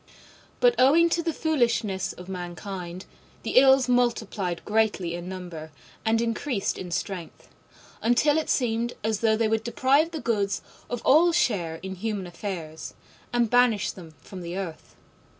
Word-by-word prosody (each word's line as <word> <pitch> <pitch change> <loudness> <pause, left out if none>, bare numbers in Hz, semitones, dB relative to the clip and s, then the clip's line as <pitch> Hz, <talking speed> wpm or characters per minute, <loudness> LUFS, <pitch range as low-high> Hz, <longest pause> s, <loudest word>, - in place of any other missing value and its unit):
But - - +5
owing 330 +6 +5
to 335 - +2
the 335 0 -1
foolishness 235 - 0
of 180 - -11
mankind 180 0 -6 0.4
the - - -1
Ills 265 -1 +5
multiplied 225 -7 0
greatly 210 -5 +1
in 175 +1 -6
number 175 -4 -7 0.3
and 225 +1 +2
increased 230 -1 -1
in 180 - -6
strength, 175 0 -5 0.5
until 290 +6 +3
it 315 - -4
seemed 235 -1 0
as 220 -1 0
though 220 -1 +3
they 225 0 +2
would 220 0 0
deprive 270 +6 +2
the 325 -2 -5
Goods 205 -6 -1 0.3
of 245 -1 -4
all 330 +5 +6
share 200 - +1
in 190 0 -4
human 200 0 -3
affairs, 170 -3 -6 0.4
and 240 -1 +2
banish 245 -2 +3
them 165 -4 -13
from 190 -2 -9
the 175 +1 -5
earth. 175 -5 -7
220 Hz, 150 wpm, -26 LUFS, 185-245 Hz, 0.5 s, all